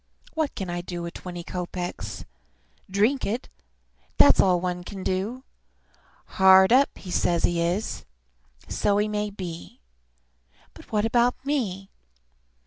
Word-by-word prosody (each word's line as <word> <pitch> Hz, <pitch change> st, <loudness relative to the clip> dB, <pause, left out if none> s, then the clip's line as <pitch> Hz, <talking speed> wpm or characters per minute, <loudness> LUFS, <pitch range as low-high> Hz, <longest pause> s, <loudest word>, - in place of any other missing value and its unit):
What 315 Hz, -3 st, -1 dB
can 190 Hz, -, -4 dB
I 175 Hz, 0 st, -3 dB
do 175 Hz, -1 st, -6 dB
with 170 Hz, -, -6 dB
twenty 175 Hz, -1 st, -7 dB
kopeks? 180 Hz, 0 st, -5 dB, 0.6 s
Drink 215 Hz, +8 st, +2 dB
it 230 Hz, +5 st, -3 dB, 0.7 s
that's -, -, +7 dB
all 180 Hz, -2 st, +4 dB
one 180 Hz, 0 st, -3 dB
can 190 Hz, +1 st, -8 dB
do! 205 Hz, +9 st, -2 dB, 0.8 s
Hard 190 Hz, +2 st, +6 dB
up, 275 Hz, +2 st, +5 dB
he 185 Hz, -, -9 dB
says 170 Hz, -1 st, +1 dB
he 170 Hz, -1 st, +2 dB
is! 175 Hz, +6 st, -1 dB, 0.6 s
So 200 Hz, 0 st, +1 dB
he 210 Hz, +1 st, +2 dB
may 210 Hz, 0 st, -2 dB
be 180 Hz, -5 st, -8 dB, 0.9 s
but -, -, -16 dB
what 210 Hz, 0 st, +1 dB
about 240 Hz, +2 st, +3 dB
me? 200 Hz, -10 st, -2 dB
190 Hz, 135 wpm, -25 LUFS, 175-215 Hz, 0.9 s, that's